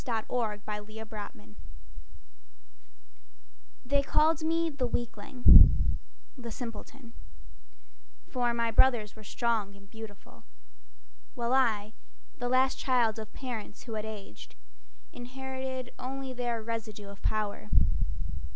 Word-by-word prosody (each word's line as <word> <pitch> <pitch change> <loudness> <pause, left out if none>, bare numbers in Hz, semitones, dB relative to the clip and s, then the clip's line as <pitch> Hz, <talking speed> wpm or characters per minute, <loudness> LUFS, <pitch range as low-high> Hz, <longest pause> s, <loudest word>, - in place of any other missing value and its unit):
Willie 220 -4 -1
Pennington 210 - -7 2.3
They 280 +2 +3
called 310 +3 +3
me 330 +1 +2
the 270 -4 -1
weakling, 240 +1 +5 0.4
the 245 -4 -7
simpleton, 235 +1 -8 1.1
For 245 -1 0
my 235 -1 0
brothers 225 -3 +4
were 215 - -12
strong 215 -2 -1
and 200 0 -16
beautiful, 220 -1 -11 0.9
While 240 +1 0
I, 220 -5 +2 0.5
the 245 0 -1
last 260 +1 +3
child 235 -4 +2
of 215 -1 -7
parents 245 -5 -6
who 230 - -7
had 215 0 -3
aged, 205 - -9 0.6
Inherited 260 0 -5
only 265 0 -4
their 240 -2 -2
residue 220 -2 -5
of 200 - -12
power. 205 - -1
235 Hz, 105 wpm, -30 LUFS, 215-255 Hz, 2.3 s, weakling